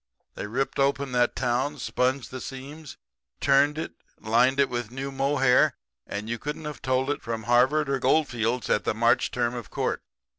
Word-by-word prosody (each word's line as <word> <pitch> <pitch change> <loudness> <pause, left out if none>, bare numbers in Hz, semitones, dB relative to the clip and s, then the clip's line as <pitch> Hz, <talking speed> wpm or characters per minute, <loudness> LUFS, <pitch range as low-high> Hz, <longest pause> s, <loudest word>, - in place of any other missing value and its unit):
They - - -5
ripped 130 +6 -2
open 140 0 +1
that 125 -1 +2
town, 130 +4 0
sponged 130 0 -1
the 130 0 -6
seams, 140 +3 -8 0.4
turned 140 +2 +3
it, 160 - -4 0.3
lined 120 +5 +3
it 140 - +5
with 120 -3 -4
new 135 +3 -5
mohair; 135 -1 +3 0.3
and 105 +2 -5
you 115 0 -3
couldn't 150 +2 -5
have 150 -1 -6
told 130 +1 +1
it - - -3
from 115 -1 -4
Harvard 130 +6 +3
or 135 -1 0
Goldfields 125 -3 +1
at - - +1
the - - -1
March 120 +3 +3
term 120 -1 -1
of 120 -3 -7
court. - - -2
130 Hz, 180 wpm, -26 LUFS, 120-140 Hz, 0.4 s, it